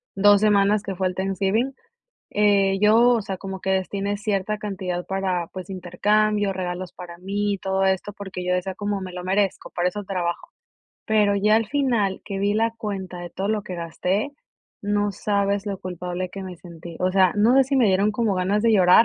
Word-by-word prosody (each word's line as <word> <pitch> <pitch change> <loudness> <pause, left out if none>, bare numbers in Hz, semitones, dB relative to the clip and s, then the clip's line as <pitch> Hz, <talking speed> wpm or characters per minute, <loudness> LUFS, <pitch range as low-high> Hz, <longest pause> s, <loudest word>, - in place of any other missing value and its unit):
2 205 +1 +6
semanas 205 -1 +3
que 195 -2 -4
fue 185 0 0
el 185 - -4
Thanksgiving. 195 +7 0 0.6
Eh, 200 -2 +3
yo, 210 +1 +5
o 235 -2 +3
sea, 195 -1 -4
como 190 -1 -6
que - - -5
destiné 195 +2 -1
cierta 205 0 -1
cantidad 185 -4 -4
para, 185 -3 -1
pues, 185 0 -8
intercambio, 205 +3 +1
regalos 180 -1 -4
para 175 -1 -10
mí 205 +3 -1
y - - -6
todo 190 0 0
esto, 190 +2 0
porque 190 -3 -7
yo 180 0 +1
decía 185 +1 -2
como: 205 -1 -2
"Me 185 - -6
lo 180 0 -6
merezco, 195 +1 0
para 175 +1 +2
eso 205 +2 -6
trabajo". 180 -3 -3 0.6
Pero 210 -2 +3
ya 210 +2 +3
al 225 - +1
final 235 -9 +1
que 195 -2 -4
vi 200 +1 +2
la 225 +1 +1
cuenta 195 -5 -5
de 175 - -7
todo 190 +3 -3
lo 215 -1 0
que 185 -2 -7
gasté, 180 - -2 0.5
no 205 0 0
sabes 200 +1 0
lo 200 -2 -3
culpable 180 0 -5
que 195 - -7
me 185 -1 -7
sentí, 170 -1 -11
o 185 0 +1
sea, 185 -2 +4
no 220 +4 +4
sé 270 - +7
si 270 +1 0
me 245 -4 +4
dieron 195 +2 +3
como 215 -2 0
ganas 190 +3 +1
de 230 -1 +4
llorar, 185 +2 +6
195 Hz, 205 wpm, -23 LUFS, 185-210 Hz, 0.6 s, sé